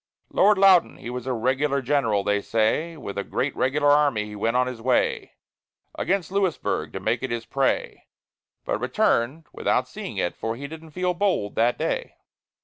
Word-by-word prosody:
Lord 205 +1 +5
Loudon, 190 -3 +5
he 120 - -7
was 125 0 -6
a 130 - 0
regular 135 +4 +1
general, 125 -7 +1
they 105 0 +1
say; 115 +11 0
With 100 -8 -5
a - - -2
great 135 +6 -2
regular 145 +2 +2
army 145 -7 +3
he 105 0 -9
went 115 +4 0
on 125 - +3
his 125 -3 -6
way, 125 +1 0 0.6
Against 185 -3 -1
Louisburg, 195 -4 -1
to - - -4
make - - -1
it - - -3
his 115 -1 -3
prey, 135 -1 -1 0.6
But - - -1
returned 135 +8 +1
without - - 0
seeing - - -7
it, 85 - -1
for 115 0 -3
he 140 +4 -7
didn't 160 +2 -9
feel 180 +3 -1
bold 175 - 0
that 120 +2 +2
day. - - -2
130 Hz, 180 wpm, -24 LUFS, 115-160 Hz, 0.6 s, Lord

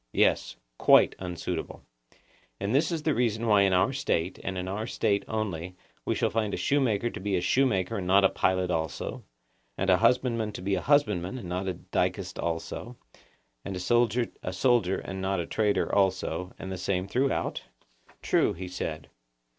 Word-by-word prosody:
Yes; - - +2 0.2
quite - - +6
unsuitable. 90 -2 -5 0.8
And 100 +3 -2
this 150 +5 +2
is 165 -3 -2
the 155 - +2
reason 115 -2 0
why 105 -3 +5
in 100 -1 +4
our 90 +9 +3
State, 95 -10 -1
and 95 -1 -3
in 90 0 -3
our 105 +4 -3
State 100 -4 0
only, 90 -5 -3 0.3
we - - 0
shall - - 0
find 110 -2 0
a - - -5
shoemaker 120 -5 +1
to - - -7
be 100 +1 -1
a - - +2
shoemaker 115 -3 +1
and 90 -2 -4
not 100 +2 +5
a 95 - +6
pilot 95 -1 +1
also, 80 -4 -3 0.5
and 95 0 +2
a 90 - +5
husbandman 115 -2 +2
to - - -7
be 100 +1 0
a 95 - 0
husbandman 105 - +2
and 115 - -7
not 90 +2 -2
a 95 - -1
dicast - - -2
also, 85 +8 -4 0.7
and 100 - -5
a - - -4
soldier 120 +4 +2 0.2
a 90 - -4
soldier 95 -3 +2
and 95 -1 -6
not 95 -1 0
a 85 - -2
trader 105 +3 0
also, 95 -2 0
and 95 - -7
the 95 - -5
same 95 0 -1
throughout? 130 +6 0 0.6
True, - - +2
he 90 +2 -7
said. 80 -4 -5
100 Hz, 185 wpm, -28 LUFS, 90-115 Hz, 0.8 s, quite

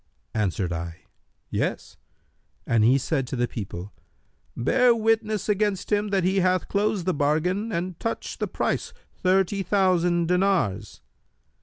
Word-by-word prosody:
Answered 95 -4 -1
I, 85 +1 -6 0.5
'Yes,' - - -2 0.7
and 115 -2 +2
he 125 +5 +5
said 135 -1 -1
to 130 - -4
the 120 0 0
people, 100 -4 -7 0.6
'Bear 245 - +4
witness 220 -2 0
against 205 -2 0
him 210 0 +2
that 195 -2 +1
he 190 +2 +2
hath 185 -1 +1
closed 205 -3 0
the 185 - +1
bargain 165 +9 0
and 175 -1 -3
touched 230 - -4
the - - -1
price, - - -2 0.2
thirty 190 +1 +1
thousand 180 -3 +2
dinars.' 180 - 0
180 Hz, 135 wpm, -25 LUFS, 130-205 Hz, 0.7 s, he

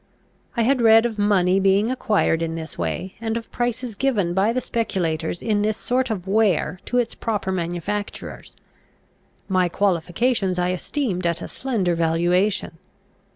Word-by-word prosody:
I 230 - +3
had 255 +2 +2
read 225 0 +6
of 225 -3 -3
money 195 -2 +3
being 195 +4 +3
acquired 210 -9 +1
in 165 0 -2
this 160 -1 -6
way, 85 - -3
and 225 0 -1
of 230 - -8
prices 240 0 -2
given 205 -7 0
by 195 +4 +2
the 250 - 0
speculators 175 -10 -2
in 210 -2 +1
this 215 +1 0
sort 255 +1 0
of 195 -4 -4
ware 195 -3 +2
to 245 - -1
its 245 -2 +1
proper 210 -4 -2
manufacturers. 185 +3 -4 0.9
My 185 -2 +2
qualifications 190 +2 0
I 180 0 +1
esteemed 185 -2 -2
at 170 -1 -2
a - - -5
slender 220 -10 -1
valuation. 170 +2 +1
200 Hz, 155 wpm, -22 LUFS, 175-225 Hz, 0.9 s, read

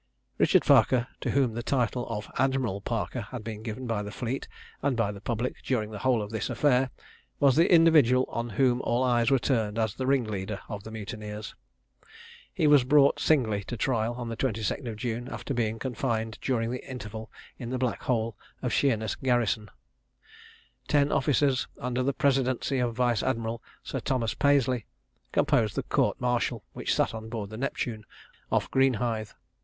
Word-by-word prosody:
Richard - - +4
Parker, 125 -2 +5
to - - -3
whom 135 -5 +2
the 120 - -3
title 125 -1 0
of 105 -2 -4
Admiral 130 -7 +1
Parker 115 +3 -2
had 115 +2 -7
been 110 -1 -6
given 115 +3 -5
by 115 -3 -1
the 105 - -5
fleet 125 +5 -4 0.3
and 135 -3 0
by 110 -3 +1
the 100 -1 -10
public 120 +3 -2
during 110 -5 -1
the 105 - -6
whole 120 -1 +2
of 105 - -7
this 110 - -2
affair, 130 +1 +2 0.5
was 140 -2 +5
the 165 +3 +4
individual 155 -7 +6
on 115 0 -3
whom 125 +3 +2
all 120 +2 +1
eyes 120 -2 +3
were 135 - +5
turned 115 -5 0
as 110 -3 0
the 130 +2 -3
ringleader 110 -7 0
of 105 -2 -5
the 110 - -8
mutineers. 105 0 -6 1.0
He 175 -5 0
was 145 -3 +6
brought 140 +2 +4
singly 110 -10 +2
to 120 - -5
trial 120 -3 0
on 120 -1 -5
the 115 - -4
22d 115 +2 -2
of 110 - -5
June, 120 +2 -3
after 140 - -5
being 115 -3 0
confined 115 -3 -2
during 115 -3 0
the 125 - -4
interval 110 -3 -7 0.3
in 120 - -5
the 130 - -1
black 125 -1 -1
hole 115 -3 0 0.3
of - - -1
Sheerness 110 -6 +1
garrison. 120 -5 0 1.2
Ten 145 -1 +3
officers, 135 -1 +2
under 125 0 -1
the 135 +2 +1
presidency 135 -1 +1
of 120 -2 0
Vice 120 -3 +2
Admiral 115 0 -2 0.2
Sir - - -4
Thomas 115 -4 -1
Paisley, 130 -5 +2 0.4
composed 110 -3 +2
the - - -1
court - - +1
martial, 125 -1 0
which - - -1
sat - - +1
on 110 0 -7
board 110 -3 -5
the 110 - -6
Neptune, 120 -4 -3 0.5
off - - +2
Greenhithe. 120 -5 +1
120 Hz, 175 wpm, -28 LUFS, 110-130 Hz, 1.2 s, individual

